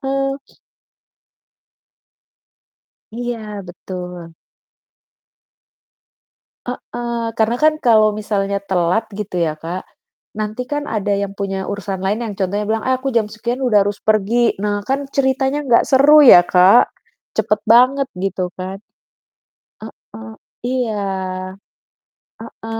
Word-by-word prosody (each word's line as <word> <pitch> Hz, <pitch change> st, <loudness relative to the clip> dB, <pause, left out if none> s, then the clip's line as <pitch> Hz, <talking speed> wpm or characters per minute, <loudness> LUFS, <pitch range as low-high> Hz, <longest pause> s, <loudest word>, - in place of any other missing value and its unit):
Heeh. 275 Hz, 0 st, -1 dB, 2.8 s
Iya 240 Hz, 0 st, -4 dB, 0.3 s
betul. 180 Hz, -2 st, -8 dB, 2.3 s
Heeh, 240 Hz, -1 st, -5 dB
karena 225 Hz, +2 st, +1 dB
kan 310 Hz, 0 st, +4 dB
kalau 220 Hz, -3 st, +5 dB
misalnya 200 Hz, -2 st, -1 dB
telat 185 Hz, +3 st, +1 dB
gitu 200 Hz, -2 st, -6 dB
ya, 165 Hz, -3 st, 0 dB
Kak, 175 Hz, +3 st, -5 dB, 0.5 s
nanti 215 Hz, +3 st, -3 dB
kan 290 Hz, +3 st, -4 dB
ada 205 Hz, -2 st, -1 dB
yang 200 Hz, 0 st, -2 dB
punya 195 Hz, -1 st, -3 dB
urusan 200 Hz, -2 st, -4 dB
lain 200 Hz, +4 st, -1 dB
yang 215 Hz, -3 st, -5 dB
contohnya 200 Hz, +2 st, -1 dB
bilang, 220 Hz, 0 st, -1 dB
"Eh 260 Hz, -, +3 dB
aku 260 Hz, +1 st, -4 dB
jam 225 Hz, -3 st, +1 dB
sekian 235 Hz, +4 st, -4 dB
udah 215 Hz, -6 st, +3 dB
harus 205 Hz, 0 st, -3 dB
pergi." 220 Hz, +3 st, +1 dB
Nah 205 Hz, -1 st, -1 dB
kan 275 Hz, +1 st, 0 dB
ceritanya 270 Hz, +1 st, 0 dB
gak 235 Hz, -, +5 dB
seru 290 Hz, +3 st, +6 dB
ya, 180 Hz, -9 st, +10 dB
Kak, 190 Hz, +6 st, +5 dB, 0.4 s
cepat 210 Hz, 0 st, +1 dB
banget 255 Hz, +4 st, +5 dB
gitu 185 Hz, -1 st, -2 dB
kan. 190 Hz, +1 st, -6 dB, 1.1 s
Heeh, 110 Hz, 0 st, -11 dB, 0.3 s
iya. 245 Hz, -4 st, -1 dB, 1.4 s
Heeh, 225 Hz, 0 st, -8 dB
215 Hz, 115 wpm, -18 LUFS, 195-245 Hz, 2.8 s, ya